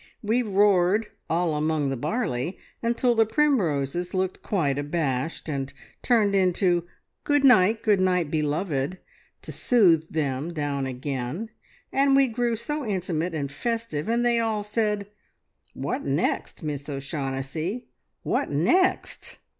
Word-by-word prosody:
We 225 +4 +2
roared 205 -1 +3 0.2
`All 165 -1 +1
among 150 -2 0
the - - -1
barley,' 165 - -2 0.2
until 240 +1 +2
the 225 -1 +4
primroses 180 - 0
looked 185 0 -1
quite 145 -9 0
abashed, 145 0 -2
and 140 -3 -3 0.3
turned 220 -5 +3
into 180 -2 +2 0.4
`Good 290 -1 +2
night, 220 -4 +5
good 210 -3 +3
night 180 -4 +1
beloved,' 150 +1 -1 0.5
to - - -7
soothe 170 -10 +3
them 150 +1 -2
down 140 -3 -2
again, 130 - -4 0.4
and 275 0 +4
we 275 0 +6
grew 240 -1 -1
so 295 +7 -4
intimate 180 -5 -2
and 140 -3 -3
festive, 225 -4 -3
and 235 +1 +1
they 235 -1 +3
all 220 -2 0
said, 210 -1 -1 0.7
`What - - -2
next, - - -1
Miss 145 -1 -4
O'Shaughnessy, 140 - -4 0.4
what - - 0
next?' 185 - +1
180 Hz, 130 wpm, -25 LUFS, 145-225 Hz, 0.7 s, we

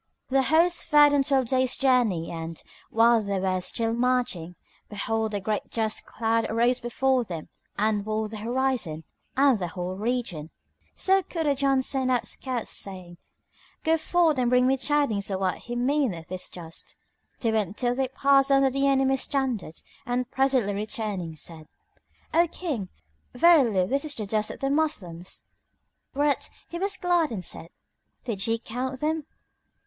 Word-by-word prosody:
The 270 +1 +3
host 335 +5 +3
fared 295 -2 +6
on 285 - +4
twelve 270 -2 +1
days' 260 -1 +2
journey 240 -11 +2
and, 165 -1 -6 0.3
while 230 0 +4
they 200 -2 -2
were 185 -1 0
still 225 +5 -1
marching, 240 -9 0 0.3
behold, 220 +1 -1
a - - 0
great 210 +2 -3
dust 220 -2 -1
cloud 225 0 0
arose 240 +3 +2
before 260 +1 +1
them 170 -7 -7 0.3
and 210 -1 +1
walled 215 0 -2
the 220 - -6
horizon 235 -8 -1 0.3
and 270 -5 +4
the 180 - -2
whole 180 +2 -5
region. 215 -9 -2 0.5
So 385 0 +3
Kurajan 280 -6 +1
sent 260 -1 0
out 250 -2 +1
scouts, 255 -4 -3
saying, 180 -3 -3 0.6
"Go 320 +1 +3
forth 320 -3 +2
and 245 -1 +2
bring 250 0 +4
me 265 +1 +3
tidings 270 -8 0
of 190 -1 -2
what 190 +4 -2
meaneth 240 - 0
this 185 0 -5
dust." 165 -2 -8 0.5
They 230 -3 +1
went 210 -3 -1
till 245 -1 +1
they 265 +1 0
passed 275 +1 +3
under 275 -1 +4
the 275 +1 +1
enemy's 270 -1 +2
standards 255 - -2 0.2
and 245 +1 -1
presently 260 -6 +2
returning 205 -5 -3
said, 155 0 -8 0.7
"O 340 +2 +4
King, 290 - -4 0.5
verily 245 - +5
this 275 - -1
is 300 -2 -2
the 215 - -4
dust 215 +1 0
of - - -8
the 275 0 0
Moslems." 185 - -2 0.7
Whereat 290 0 +1 0.2
he 340 - -5
was 395 +1 -1
glad 350 -3 +2
and 190 -6 -4
said, 165 - -3 0.5
"Did 220 -5 -1
ye 225 0 +1
count 255 +3 -4
them?" 310 +1 -1
245 Hz, 160 wpm, -26 LUFS, 200-275 Hz, 0.7 s, fared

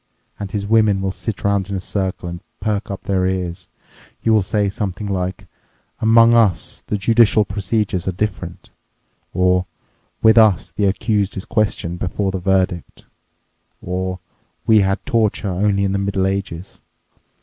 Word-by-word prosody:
And 100 - -5
his 100 0 -2
women 110 -2 +3
will 95 0 -1
sit 100 +1 -5
around 100 -1 +1
in 100 - -2
a - - -2
circle 95 -1 -3
and 85 0 -6 0.2
perk 105 0 -2
up 100 - -6
their 95 -2 +1
ears. 90 -2 -3 0.6
You 115 - +3
will 110 - +5
say 105 +1 0
something 100 0 -4
like, 95 -2 -3 0.5
'Among 115 +1 +6
us 105 -8 +2
the 105 - -1
judicial 110 0 +4
procedures 100 -1 -2
are - - +2
different,' 95 -2 -4 0.6
or 90 0 +2 0.6
'With 110 +1 +7
us 95 -5 +3
the 100 +4 -1
accused 105 0 0
is 95 - -4
questioned 100 -6 -1
before 95 +2 -1
the 95 - -3
verdict,' 90 -2 -1 0.7
or 90 +1 -3 0.5
'We 110 -1 +6
had 95 -1 0
torture 110 -3 +1
only 100 +2 +1
in 100 - +1
the 100 - 0
Middle 100 -1 0
Ages. 95 -2 -4
100 Hz, 155 wpm, -19 LUFS, 95-105 Hz, 0.7 s, With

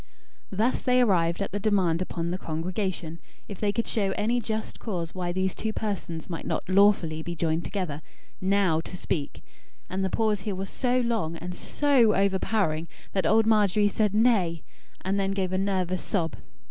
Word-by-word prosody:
Thus 220 +6 +1
they 250 0 +3
arrived 180 -6 +2
at - - -5
the 205 - -2
demand 190 -5 +2
upon 170 -2 -2
the 185 - -2
congregation, 170 0 -3 0.3
if 200 - -8
they 205 -1 +1
could 230 +2 -1
show 195 -3 0
any 235 +4 +1
just 220 -1 -4
cause 175 -7 -4
why 180 -2 -2
these 185 +1 0
two 220 - -3
persons 185 -7 -3
might 165 -2 -5
not - - -2
lawfully 185 -5 +4
be 170 +2 -5
joined 165 0 0
together, 170 -7 -3 0.4
NOW 190 -4 +2
to 180 - -7
speak 150 -5 -3 0.5
and 190 +1 -1
the 190 - +1
pause 215 0 +1
here 200 0 -3
was 190 +1 -5
so 250 0 +1
long, 225 -9 -1
and 180 +2 -6
so 260 -2 +3
over 195 0 +2
powering, 170 -8 0 0.3
that 190 -4 +1
old 220 +4 +4
Margery 210 -2 +4
said 210 0 +1
"nay"; 200 -8 +3 0.4
and 195 +2 0
then 195 0 0
gave 190 -2 -1
a 185 - +1
nervous 185 -2 0
sob. 165 -6 -1
190 Hz, 185 wpm, -27 LUFS, 170-210 Hz, 0.5 s, lawfully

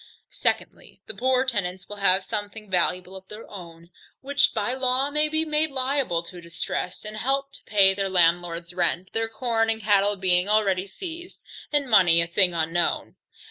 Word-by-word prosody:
Secondly, - - -3
The - - -7
poorer 260 +1 +1
tenants 190 -7 -3
will 205 - -7
have 190 -1 +3
something 210 -1 -5
valuable 180 +1 0
of 190 0 -12
their 210 +3 -10
own, 170 -3 -12 0.3
which 285 +1 +2
by 220 +2 -2
law 260 +2 0
may 300 +1 +1
be 315 +1 0
made 310 0 +1
liable 260 -10 -1
to 180 +1 -11
a - - -12
distress, 170 +3 -5
and 215 0 -7
help 275 +4 -1
to 285 - -13
pay 195 -2 +4
their 195 0 -2
landlord's 175 -1 +1
rent, 180 0 -1
their 225 0 -1
corn 225 0 -1
and 225 0 0
cattle 205 -1 +2
being 185 0 +1
already 200 -3 +2
seized, 345 - -9 0.3
and 290 -2 0
money 180 -7 +5
a 170 - +3
thing 180 +2 +3
unknown. 165 +1 -1
205 Hz, 180 wpm, -24 LUFS, 180-255 Hz, 0.3 s, money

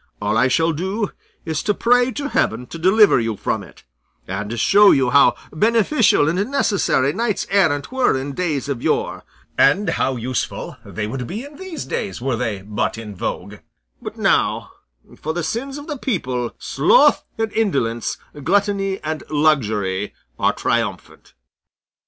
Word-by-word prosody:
All 105 +1 -1
I 125 +3 +4
shall 160 +5 +2
do 190 +6 -2 0.3
is 160 -2 -2
to 210 -1 0
pray 245 +1 +3
to 285 0 -3
heaven 115 - 0
to 165 - -9
deliver 195 - +5
you 115 -2 -2
from - - -2
it, - - -15 0.4
and 100 +5 -4
show 205 - +6
you 130 -3 +3
how 140 +2 +5 0.2
beneficial 225 - +3
and 185 +8 0
necessary 200 - +1
knights 225 0 -1
errant 165 - +2
were 260 - +2
in 140 +1 -5
days 155 -5 -2
of 135 -4 -3
yore, - - -1 0.4
and 190 +10 +4
how 130 - 0
useful 125 +1 -4
they 105 - -5
would 125 +3 -5
be 215 +7 -5
in 290 +1 -12
these 375 -5 -6
days 200 - -4
were 130 0 -1
they 110 -5 -3
but 105 +2 -2
in 105 -3 -8
vogue; 100 +3 -5 0.4
but - - -7
now, - - +1 0.5
for 160 +1 -4
the 175 - -2
sins 255 - -3
of 290 - -8
the 295 -4 -5
people, 130 - -2
sloth - - +3
and 225 -1 -2
indolence, 125 - -1 0.3
gluttony 195 +2 +1
and 155 0 -3
luxury 110 -11 0 0.2
are - - +3
triumphant." - - -3
155 Hz, 160 wpm, -20 LUFS, -, 0.5 s, show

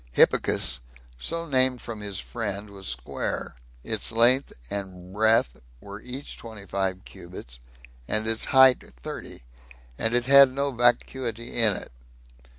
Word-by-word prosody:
Hippicus, - - +4 0.4
so 165 - -2
named 130 -4 +1
from 115 -2 -7
his 100 -3 -3
friend, 105 -2 -5
was 95 -1 -10
square; 60 0 -3 0.3
its - - -2
length 120 +4 +3 0.2
and 95 -2 -6
breadth 110 - +2 0.2
were 100 +5 -10
each 130 +3 -6
twenty 110 -4 -10
five 95 -1 -3
cubits, 85 -10 -11 0.5
and 110 0 0
its 110 0 +2
height 130 -1 +6 0.2
thirty, - - -8 0.6
and 115 +1 0
it 120 0 +1
had 140 0 +7
no 140 +1 -1
vacuity 120 -1 0
in 110 -4 +5
it. - - -8
115 Hz, 135 wpm, -25 LUFS, 100-125 Hz, 0.6 s, had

